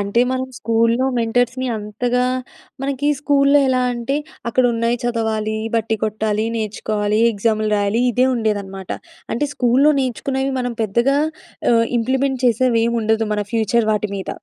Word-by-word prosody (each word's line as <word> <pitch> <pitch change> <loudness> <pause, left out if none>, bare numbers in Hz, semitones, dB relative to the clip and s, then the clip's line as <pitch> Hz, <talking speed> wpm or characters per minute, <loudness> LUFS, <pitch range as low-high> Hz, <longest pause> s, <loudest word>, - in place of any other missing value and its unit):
అంటే 200 +4 +1
మనం 260 0 -2
స్కూల్‌లో, 230 +3 +2
మెంటర్స్‌ని 245 +2 0
అంతగా 240 +4 -1 0.6
మనకి 275 +1 -1
స్కూల్‌లో 285 -1 +4
ఎలా 255 -1 +2
అంటే, 240 +3 -2 0.3
అక్కడ 255 +2 +2
ఉన్నాయి 230 +1 0
చదవాలి, 220 -2 -1 0.2
బట్టీ 225 0 0
కొట్టాలి, 215 0 -1
నేర్చుకోవాలి, 210 0 -1
ఎగ్జామ్‌లు 215 +1 0
రాయాలి. 205 +3 +1
ఇదే 250 +3 +3
ఉండేదనమాట. 200 -4 -3 0.4
అంటే 235 - 0
స్కూల్‌లో 265 +5 +4
నేర్చుకున్నవి 265 +1 -2
మనం 245 -1 -3
పెద్దగా 235 +6 +2 0.6
ఆహ్, 230 0 +3
ఇంప్లిమెంట్ 265 +2 0
చేసేవి 235 0 +2
ఏం 235 - 0
ఉండదు. 220 +1 +1
మన 210 - -1
ఫ్యూచర్ 225 0 +1
వాటి 210 -1 -1
మీద. 190 - -6
230 Hz, 135 wpm, -19 LUFS, 215-255 Hz, 0.6 s, స్కూల్‌లో